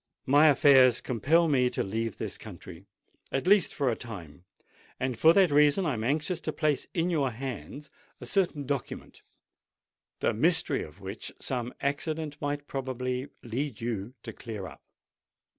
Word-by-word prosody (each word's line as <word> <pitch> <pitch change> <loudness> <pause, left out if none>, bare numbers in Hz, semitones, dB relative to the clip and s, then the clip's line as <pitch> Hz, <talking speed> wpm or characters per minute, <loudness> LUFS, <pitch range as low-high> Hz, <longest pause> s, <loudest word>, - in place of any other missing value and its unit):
"My 145 +4 +6
affairs 135 -3 +6
compel 150 +9 +2
me 130 -4 +3
to - - -2
leave 110 +2 -3
this - - -4
country—at 135 - -9
least 200 0 +5
for 135 -4 +1
a - - -1
time; 90 -9 -10 0.5
and 130 -1 -1
for 160 +7 +6
that 190 -4 +4
reason 150 +5 +4
I 150 - +1
am 110 -2 -3
anxious 155 +7 -1
to - - -2
place 155 -3 0
in 175 +1 +1
your 145 -5 +1
hands 135 +4 -7 0.3
a - - -8
certain 170 -7 0
document, 140 -1 -5 1.0
the - - +1
mystery - - +2
of 80 +6 -10
which 95 +3 -6
some 125 -2 -3
accident 150 +1 -2
might 145 0 -2
probably 130 -1 -3 0.2
lead 120 0 -3
you 115 0 -4
to - - -7
clear 110 -5 -7
up." - - -11
135 Hz, 155 wpm, -28 LUFS, 120-150 Hz, 1.0 s, My